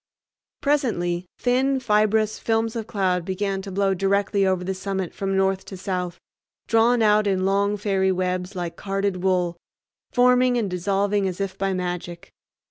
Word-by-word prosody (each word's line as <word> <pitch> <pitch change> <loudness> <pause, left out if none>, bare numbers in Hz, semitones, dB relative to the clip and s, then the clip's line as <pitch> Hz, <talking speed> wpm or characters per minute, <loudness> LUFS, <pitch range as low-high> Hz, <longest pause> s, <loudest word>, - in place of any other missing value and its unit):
Presently 185 -12 0
thin, 265 +2 +1
fibrous 215 -2 +2
films 225 0 0
of 225 -2 -4
cloud 185 -4 0
began 195 +2 -2
to 195 0 -8
blow 195 0 +1
directly 195 +1 +1
over 185 -1 0
the 190 +1 -2
summit 190 -1 -3
from 195 -1 -2
north 190 0 +1
to 190 - -8
south, 180 -2 -3 0.5
drawn 230 +1 +3
out 210 -1 +4
in 190 -1 +1
long 200 +1 +1
fairy 195 -2 +1
webs 185 +1 -2
like 175 -2 -4
carded 195 -2 -2
wool, 180 -2 +1 0.5
forming 250 0 +4
and 210 -5 -1
dissolving 195 +2 0
as 185 0 -4
if 195 -1 -3
by 195 0 -1
magic. 175 -1 -5
195 Hz, 155 wpm, -23 LUFS, 185-210 Hz, 0.5 s, out